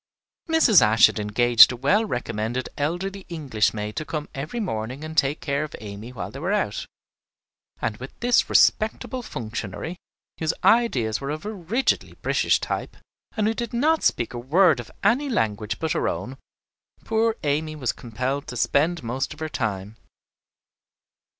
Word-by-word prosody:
Mrs. 300 - +6
Ashe 110 +1 +6
had - - +1
engaged 115 +3 +6
a - - -4
well 165 - +2
recommended 120 - -3
elderly 185 +6 -3
English 140 -11 0
maid 105 0 -5
to - - -1
come 155 -1 -5
every 150 - -5
morning 130 - -4
and 155 0 -7
take 145 -1 +1
care 140 +1 -1
of 155 - -7
Amy 105 +3 -8
while 125 - -6
they - - -8
were - - -2
out; - - -1 0.9
and 105 - -2
with 130 +2 -10
this 245 0 +3
respectable 220 +4 +2
functionary, 115 - -5 0.4
whose 160 0 0
ideas 130 - +3
were 140 - -4
of 155 +5 -4
a 215 - -4
rigidly 210 +7 -1
British - - +2
type - - -4 0.4
and 215 - +2
who 220 - +2
did 235 0 -5
not 310 +7 +2
speak 120 - +1
a 120 - -4
word 160 +4 +4
of 120 - -8
any 275 +4 +2
language 110 - -1
but 160 -1 -2
her - - 0
own, 110 +11 -4 0.7
poor 225 0 +1
Amy 155 +2 -1
was 130 -6 -1
compelled 130 +5 -4
to 125 - -6
spend 160 +6 +1
most 130 +6 -3
of - - -18
her 155 0 -3
time. 105 -4 -3
140 Hz, 165 wpm, -24 LUFS, 115-190 Hz, 0.9 s, Mrs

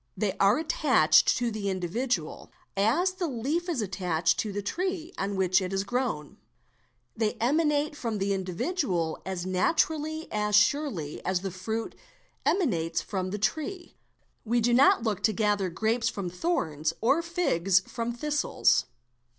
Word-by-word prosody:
They 195 -1 0
are 200 +3 +5
attached 300 - +4
to 240 -2 -1
the 210 -2 -3
individual, 185 0 -2 0.2
as 240 - +2
the 370 -2 -3
leaf 295 +7 -2
is 275 -10 0
attached 180 -4 0
to 215 - -1
the 205 +1 -4
tree 360 - -3
on 200 +1 -2
which 190 0 +3
it 185 - -2
has 195 0 -1
grown; 225 - -3 0.8
they 220 -1 0
emanate 295 +3 +1
from 230 -6 -3
the 200 0 0
individual 185 - -2
as 185 -2 -3
naturally 315 - 0
and 210 0 0
as 210 - +2
surely 210 - +1
as 185 -1 0
the 195 -1 -4
fruit 220 +5 -4 0.5
emanates 170 - +1
from 185 -2 -3
the 205 - -3
tree. 345 - -3 0.5
We 240 +1 +1
do 240 +1 +2
now 260 +3 +7
7 - - -7
look 215 -5 -1
to 220 - +2
gather 205 -2 +1
grapes 220 +6 0
from 185 -3 -5
thorns 165 - -1
or 275 +8 +3
figs 195 - +2
from 235 +3 -4
thistles. 295 - +1
215 Hz, 155 wpm, -28 LUFS, 185-295 Hz, 0.8 s, now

